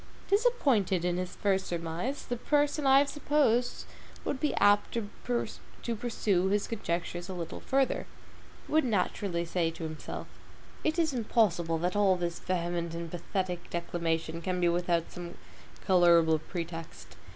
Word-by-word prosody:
Disappointed 275 - +2
in 175 0 +1
his 180 0 -4
first 195 -2 +1
surmise, 170 - -3
the 245 - -2
person 290 +3 +1
I 270 0 +7
have 280 +1 +5
supposed 280 -5 +1 0.4
would 265 - -2
be 300 - 0
apt 205 +2 +4
to 210 -3 -3 0.9
pursue 210 -5 0
his 205 +1 +1
conjectures 175 -4 -3
a 190 - -4
little 170 -2 -5
further. 270 0 0 0.6
He - - -13
would 315 0 +5
naturally 190 -5 0
say 170 -1 0
to 165 0 -8
himself, 155 -1 -5 0.6
it 310 +2 +1
is 320 -4 +2
impossible 195 -8 +2
that 180 +3 -1
all 200 -2 +4
this 175 -1 -3
vehement 170 -2 -2
and 170 -1 -5
pathetic 180 0 -3
declamation 165 -1 -2
can 180 +1 -1
be 175 -1 +3
without 170 -1 0
some 175 -1 -7 0.5
colorable 170 -4 +5
pretext. 165 -1 -7
180 Hz, 145 wpm, -30 LUFS, 170-230 Hz, 0.9 s, I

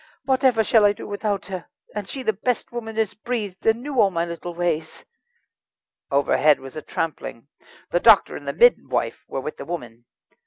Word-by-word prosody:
whatever 260 -4 +3
shall 220 0 +4
I 205 0 +5
do - - -9
without 205 -1 -2
her? 185 -3 -6 0.3
and 205 -2 -5
she 265 - -5
the 220 - +1
best 230 +4 -2
woman 225 -2 -6
as 220 -3 +1
breathed, 215 -5 -4
and 225 +2 +3
knew 275 -4 +1
all 200 - +5
my 170 -2 -1
little 170 0 -6
ways." 165 -2 -2 1.0
Overhead 145 +1 +3
was 135 0 -11
a 155 - -5
trampling. 145 -7 -4 0.4
The - - +3
doctor - - +6
and - - -9
the - - -1
midwife 485 +1 +2
were 135 - -4
with 150 - -6
the - - -7
woman. 120 -9 -7
200 Hz, 185 wpm, -23 LUFS, 165-225 Hz, 1.0 s, doctor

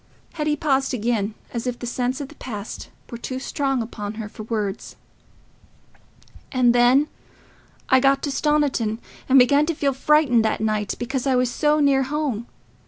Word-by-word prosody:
Hetty 300 -1 0
paused 270 -3 0
again, 220 -2 -1 0.2
as 235 +1 -3
if 245 -1 -2
the 245 - -7
sense 250 +2 -2
of 280 -2 -6
the - - -13
past 215 -4 -7 0.2
were 235 - -6
too 255 +2 -5
strong 270 -2 -1
upon 210 -2 -6
her 220 -1 -5
for 210 - -10
words. 210 -2 -4 1.6
"And 250 -3 +3
then 245 +4 +4 0.8
I 260 - +5
got 275 +1 +3
to 285 - -1
Stoniton, 275 -7 +1 0.3
and 265 - +6
I 255 - +9
began 285 +4 +3
to 335 - -1
feel 280 -2 0
frightened 270 -4 +3
that 220 - 0
night, 215 -1 -1
because 260 +2 -3
I 265 - +3
was 250 -1 +1
so 300 +4 +2
near 280 -2 +4
home. 270 -4 -2
255 Hz, 170 wpm, -22 LUFS, 230-280 Hz, 1.6 s, I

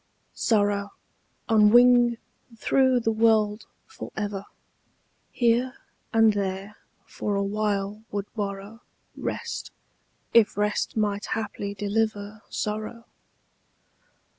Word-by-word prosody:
SORROW, 205 -2 +1 0.6
on 215 -2 +5
wing 240 0 +6 0.4
through 260 +1 +3
the 225 - +1
world 220 -1 +2 0.2
for 445 - -9
ever, 205 -2 -3 0.9
Here 245 +2 +2 0.4
and 225 -2 +5
there 195 +1 -3 0.3
for 205 - -3
awhile 200 0 -1
would 200 -1 -3
borrow 205 +1 -5 0.3
Rest, - - -4 0.6
if 225 -3 +5
rest 210 +2 0
might 205 -1 0
haply 200 -2 -4
deliver 210 0 -2
Sorrow. 215 +2 -4
210 Hz, 90 wpm, -26 LUFS, 205-225 Hz, 0.9 s, wing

